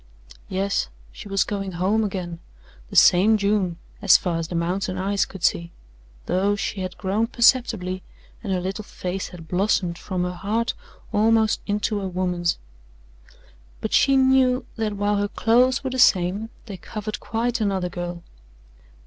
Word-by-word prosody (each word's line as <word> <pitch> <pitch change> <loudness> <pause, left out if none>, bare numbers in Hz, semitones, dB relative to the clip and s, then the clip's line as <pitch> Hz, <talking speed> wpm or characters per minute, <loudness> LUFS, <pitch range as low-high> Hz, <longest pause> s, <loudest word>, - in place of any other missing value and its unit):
Yes, 195 - -1 0.2
she - - -10
was 195 -1 +2
going 195 -2 -4
home 195 +6 +1
again, 180 -4 -4 0.5
the - - -9
same 205 +5 +6
June 200 -4 0 0.2
as - - +7
far 170 -3 -2
as 165 +1 -5
mountain 185 +2 -1
eyes 195 +2 +1
could 190 -2 -11
see, 170 -1 +1 0.5
though 200 +3 +1
she 195 0 -3
had 185 -1 -5
grown 210 +3 0
perceptibly, 230 -7 +2 0.4
and 200 - -3
her 185 - +1
little 190 +4 -4
face 185 -1 -5
had 165 -3 -11
blossomed 180 -2 0
from 185 -2 -3
her 180 0 -2
heart 220 +7 -1 0.4
almost 220 +1 +3
into 205 0 -1
a 190 - -3
woman's, 180 -2 -1 1.2
but - - -4
she 275 -1 +5
knew 260 -1 +3
that 220 -2 -2
while 205 0 +1
her 205 0 0
clothes 250 +6 +2
were 265 - -2
the 260 - -3
same, 195 0 +3 0.2
they 200 -5 -7
covered 215 +4 -6
quite 235 +1 -2
another 190 -3 0
girl. 175 0 -6
195 Hz, 155 wpm, -23 LUFS, 180-220 Hz, 1.2 s, as